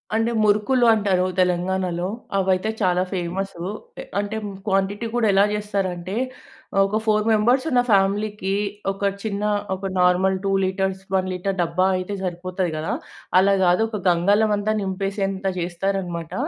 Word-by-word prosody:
అంటే 225 Hz, +1 st, +1 dB
మురుకులు 215 Hz, +5 st, +3 dB
అంటారు 195 Hz, -4 st, +1 dB
తెలంగాణలో. 180 Hz, 0 st, 0 dB, 0.3 s
అవయితే 190 Hz, +2 st, +1 dB
చాలా 180 Hz, -1 st, +2 dB
ఫేమసు 180 Hz, 0 st, -3 dB, 0.6 s
అంటే 205 Hz, +2 st, -4 dB, 0.3 s
క్వాంటిటీ 195 Hz, +3 st, 0 dB
కూడా 235 Hz, -2 st, +2 dB
ఎలా 200 Hz, +1 st, +6 dB
చేస్తారంటే 195 Hz, -3 st, -3 dB, 0.6 s
ఆహ్, -, -, +3 dB
ఒక 205 Hz, +2 st, -1 dB
ఫోర్ 215 Hz, -1 st, +2 dB
మెంబర్స్ 230 Hz, +4 st, +3 dB
ఉన్న 250 Hz, -3 st, +4 dB
ఫ్యామిలీకి 200 Hz, 0 st, +1 dB, 0.4 s
ఒక 195 Hz, -, -10 dB, 0.2 s
చిన్న 205 Hz, -1 st, -3 dB, 0.3 s
ఒక 190 Hz, +1 st, -7 dB
నార్మల్ 180 Hz, +1 st, +3 dB
2 195 Hz, -, 0 dB
లీటర్స్ 190 Hz, 0 st, -1 dB
1 185 Hz, -1 st, +2 dB
లీటర్ 190 Hz, +2 st, -2 dB
డబ్బా 170 Hz, +2 st, +1 dB
అయితే 185 Hz, +2 st, -4 dB
సరిపోతాది 180 Hz, 0 st, -2 dB
గదా. 155 Hz, +1 st, -2 dB, 0.4 s
అలా 195 Hz, +2 st, +5 dB
గాదు 180 Hz, +2 st, +4 dB
ఒక 215 Hz, -2 st, -4 dB
గంగాలం 200 Hz, +5 st, +3 dB
అంతా 205 Hz, +1 st, -1 dB
నింపేసేంత 195 Hz, 0 st, -2 dB
జేస్తారు 180 Hz, +3 st, -1 dB
అన్నమాట. 170 Hz, -3 st, -6 dB
195 Hz, 140 wpm, -22 LUFS, 180-205 Hz, 0.6 s, ఎలా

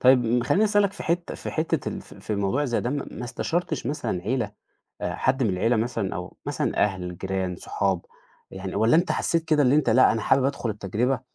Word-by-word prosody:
طيّب 125 Hz, -2 st, +4 dB
خلّيني 205 Hz, +10 st, +3 dB
أسألك 205 Hz, -2 st, +3 dB
في -, -, -8 dB
حتّة 170 Hz, +1 st, -1 dB
في -, -, -6 dB
حتّة 160 Hz, +1 st, -1 dB
ال -, -, -5 dB
في -, -, -14 dB
في 110 Hz, -, -4 dB
الموضوع 100 Hz, +8 st, 0 dB
زي 120 Hz, -4 st, 0 dB
ده، 120 Hz, -, -2 dB
ما 140 Hz, -3 st, -4 dB
استشرتش 160 Hz, +1 st, -2 dB
مثلًا 115 Hz, -10 st, -2 dB
عيلة، 115 Hz, -1 st, -1 dB, 0.5 s
آآ 90 Hz, -, -2 dB
حد 130 Hz, 0 st, +1 dB
من 110 Hz, -, +2 dB
العيلة 115 Hz, +6 st, +2 dB
مثلًا، 110 Hz, -4 st, -1 dB
أو 90 Hz, 0 st, -6 dB
مثلًا -, -, -1 dB
أهل، 90 Hz, -3 st, -4 dB
جيران، 95 Hz, -2 st, -2 dB
صحاب 95 Hz, -2 st, -1 dB, 0.5 s
يعني، 95 Hz, 0 st, -6 dB
والّا 115 Hz, +7 st, +4 dB
أنت 175 Hz, -, +2 dB
حسّيت 165 Hz, -1 st, 0 dB
كده 155 Hz, -2 st, +3 dB
إن 130 Hz, 0 st, +4 dB
أنت 150 Hz, -4 st, +3 dB
لأ 130 Hz, +3 st, +6 dB
أنا 115 Hz, -, -1 dB
حابب 135 Hz, 0 st, +3 dB
أدخل 125 Hz, -4 st, -1 dB
التجربة، 110 Hz, +6 st, -1 dB
120 Hz, 205 wpm, -25 LUFS, 100-145 Hz, 0.5 s, لأ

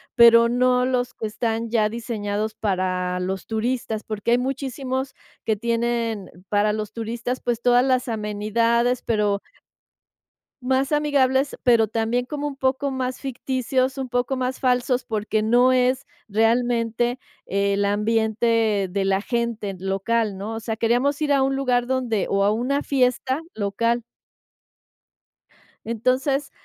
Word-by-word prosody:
pero 235 Hz, -1 st, +7 dB
no 250 Hz, +1 st, +3 dB
los 250 Hz, -1 st, -1 dB
que 220 Hz, -, -4 dB
están 225 Hz, +1 st, -2 dB
ya 215 Hz, -2 st, +2 dB
diseñados 215 Hz, -2 st, -3 dB
para 185 Hz, -2 st, -1 dB
los 190 Hz, +1 st, -3 dB
turistas, 225 Hz, -1 st, -2 dB
porque 215 Hz, +1 st, -3 dB
hay 240 Hz, -, +5 dB
muchísimos 265 Hz, 0 st, -3 dB, 0.3 s
que 220 Hz, -, +1 dB
tienen 230 Hz, -1 st, -1 dB, 0.2 s
para 210 Hz, 0 st, +2 dB
los 215 Hz, -1 st, -4 dB
turistas, 235 Hz, +3 st, -4 dB
pues, 240 Hz, -1 st, -2 dB
todas 245 Hz, +1 st, +4 dB
las 255 Hz, -1 st, +1 dB
amenidades, 230 Hz, +3 st, 0 dB
pero 210 Hz, -2 st, 0 dB, 1.2 s
más 265 Hz, +2 st, 0 dB
amigables, 280 Hz, -2 st, +2 dB
pero 230 Hz, -3 st, +4 dB
también 230 Hz, +3 st, -1 dB
como 295 Hz, +1 st, -4 dB
un 280 Hz, -, -5 dB
poco 265 Hz, +1 st, 0 dB
más 255 Hz, -1 st, -3 dB
ficticios, 260 Hz, 0 st, -1 dB
un 260 Hz, -2 st, -4 dB
poco 245 Hz, +2 st, 0 dB
más 255 Hz, 0 st, -2 dB
falsos, 250 Hz, -1 st, +1 dB
porque 215 Hz, 0 st, -1 dB
no 245 Hz, +3 st, +4 dB
es 255 Hz, +1 st, +1 dB, 0.2 s
realmente 235 Hz, +2 st, +1 dB, 0.3 s
el 200 Hz, +1 st, 0 dB
ambiente 220 Hz, 0 st, +1 dB
de 195 Hz, +1 st, -1 dB
la 195 Hz, 0 st, +1 dB
gente 235 Hz, -4 st, -2 dB
local, 195 Hz, +2 st, -1 dB
¿no? 215 Hz, +3 st, -5 dB
O -, -, -4 dB
sea, 220 Hz, 0 st, -3 dB
queríamos 250 Hz, +6 st, +1 dB
ir 290 Hz, -1 st, +2 dB
a 270 Hz, -1 st, +3 dB
un 270 Hz, 0 st, +1 dB
lugar 250 Hz, -3 st, +1 dB
donde 250 Hz, -6 st, 0 dB
o 200 Hz, 0 st, +2 dB
a 205 Hz, -, +4 dB
una 260 Hz, +6 st, 0 dB
fiesta 260 Hz, +1 st, +1 dB
local. 230 Hz, +3 st, -1 dB, 1.8 s
Entonces, 260 Hz, +4 st, 0 dB
235 Hz, 135 wpm, -23 LUFS, 215-255 Hz, 1.8 s, pero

